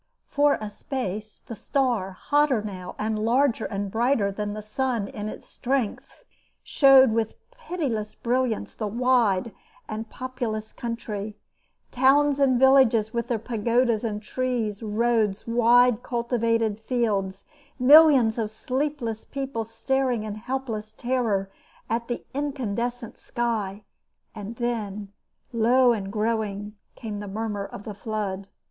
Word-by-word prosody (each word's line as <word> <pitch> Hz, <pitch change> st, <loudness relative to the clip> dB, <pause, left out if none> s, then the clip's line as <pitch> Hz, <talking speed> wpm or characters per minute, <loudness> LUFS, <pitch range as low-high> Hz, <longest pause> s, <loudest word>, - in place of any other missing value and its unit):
For 290 Hz, 0 st, +2 dB
a 215 Hz, -1 st, -6 dB
space 215 Hz, -3 st, -5 dB
the -, -, -7 dB
star, 235 Hz, -3 st, 0 dB
hotter 285 Hz, +1 st, +1 dB
now 185 Hz, -3 st, -7 dB
and 215 Hz, 0 st, -1 dB
larger 235 Hz, +1 st, +2 dB
and 200 Hz, -1 st, -3 dB
brighter 230 Hz, -2 st, +2 dB
than 205 Hz, +1 st, -4 dB
the 215 Hz, -, -6 dB
sun 230 Hz, -1 st, -1 dB
in 210 Hz, +1 st, -5 dB
its -, -, -10 dB
strength, 255 Hz, -, -3 dB, 0.4 s
showed 270 Hz, -3 st, +6 dB
with 220 Hz, -1 st, -1 dB, 0.2 s
pitiless 320 Hz, -, -4 dB
brilliance 245 Hz, -2 st, -1 dB
the 215 Hz, -, -3 dB
wide 230 Hz, -3 st, +2 dB, 0.3 s
and 220 Hz, +1 st, -5 dB
populous 240 Hz, -4 st, -4 dB
country; 215 Hz, -3 st, -5 dB, 0.5 s
towns 280 Hz, +2 st, +4 dB
and 260 Hz, -3 st, +3 dB
villages 255 Hz, -5 st, +5 dB
with 235 Hz, -1 st, -2 dB
their 235 Hz, -, 0 dB
pagodas 230 Hz, +1 st, +1 dB
and 210 Hz, -2 st, -3 dB
trees, 235 Hz, -3 st, -2 dB
roads, 220 Hz, -2 st, 0 dB
wide 240 Hz, 0 st, +4 dB
cultivated 230 Hz, -3 st, 0 dB
fields, 205 Hz, -5 st, -1 dB, 0.3 s
millions 265 Hz, -4 st, +7 dB
of 220 Hz, -2 st, -1 dB
sleepless 255 Hz, -1 st, -3 dB
people 270 Hz, -4 st, -4 dB
staring 245 Hz, +1 st, -1 dB
in 215 Hz, -1 st, -4 dB
helpless 225 Hz, -1 st, -4 dB
terror 230 Hz, -6 st, -1 dB, 0.4 s
at 235 Hz, +1 st, -1 dB
the 240 Hz, -, -4 dB
incandescent 245 Hz, -4 st, -3 dB
sky; 215 Hz, -4 st, -2 dB, 0.5 s
and 215 Hz, +1 st, -7 dB
then, 210 Hz, -4 st, -3 dB, 0.4 s
low 240 Hz, +2 st, +4 dB
and 195 Hz, -3 st, -4 dB
growing, 210 Hz, -1 st, -2 dB, 0.2 s
came 210 Hz, -3 st, -6 dB
the 205 Hz, -, -6 dB
murmur 205 Hz, -1 st, -3 dB
of 200 Hz, -, -9 dB
the 210 Hz, -, -6 dB
flood. 200 Hz, -2 st, -4 dB
230 Hz, 125 wpm, -25 LUFS, 210-255 Hz, 0.5 s, millions